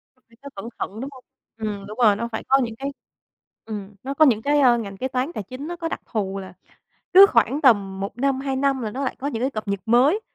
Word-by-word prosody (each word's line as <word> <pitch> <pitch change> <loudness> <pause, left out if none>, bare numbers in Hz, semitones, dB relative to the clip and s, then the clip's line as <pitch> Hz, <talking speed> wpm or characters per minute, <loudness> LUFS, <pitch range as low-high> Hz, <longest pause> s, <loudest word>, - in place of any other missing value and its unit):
Phải 230 -2 -27
nhớ 280 - -7
cẩn 195 +4 -7
thận, 210 - -4
đúng 270 - -4
hông? 255 -1 -14 0.3
Ừm, 210 -3 -4
đúng 210 +2 -9
rồi, 210 -3 +6
nó 230 +3 -3
phải 220 - -4
có 270 +1 +5
những 230 -2 -4
cái 275 +4 -5 0.7
ừm, 210 -2 -7
nó 270 +2 -3
có 310 +3 +5
những 230 -6 +3
cái, 290 +4 +2
ơ, 250 -4 +5
ngành 200 -4 -6
kế 260 - -2
toán 260 +4 -2
tài 215 - -4
chính 255 +9 -8
nó 345 - -4
có 340 -1 -4
đặc - - -5
thù 195 -3 -3
là 190 -2 -9 0.6
cứ 385 +2 +11
khoảng 240 +5 +2
tầm 200 -7 +3
1 195 +3 -5
năm, 270 +1 +1
2 270 -1 -2
năm 270 0 +1
là 215 -2 -3
nó 270 +5 -4
lại 265 - -2
có 275 - -3
những 235 -4 -3
cái 265 - 0
cập 215 -4 -5
nhật 200 0 -1
mới, 260 - +4
240 Hz, 265 wpm, -23 LUFS, 210-275 Hz, 0.7 s, cứ